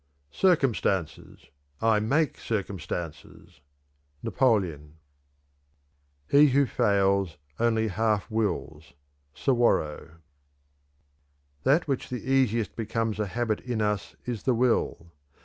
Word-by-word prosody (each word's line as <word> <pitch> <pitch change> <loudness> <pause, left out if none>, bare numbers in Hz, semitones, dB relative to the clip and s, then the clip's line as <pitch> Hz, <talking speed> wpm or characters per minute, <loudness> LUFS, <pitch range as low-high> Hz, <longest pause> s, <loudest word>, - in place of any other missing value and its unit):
"Circumstances! 130 - 0 0.3
I 110 -1 +3
make 140 +7 0
circumstances!" 90 -7 -5 0.6
Napoleon. 85 - 0 1.3
"He 145 - +6
who 140 +1 +3
fails 100 - +1 0.2
only 110 -1 +2
half 105 0 0
wills." 80 -10 -3 0.4
Suwarrow. 80 - 0 1.5
"That 150 - +2
which 135 -3 -2
the 125 - -5
easiest 120 -5 +1
becomes 115 -1 -2
a 105 - 0
habit 110 +2 -1
in 125 -3 -3
us 105 -2 -1
is 120 -4 -4
the 130 - +1
will. 115 -8 0
110 Hz, 95 wpm, -27 LUFS, 95-125 Hz, 1.5 s, He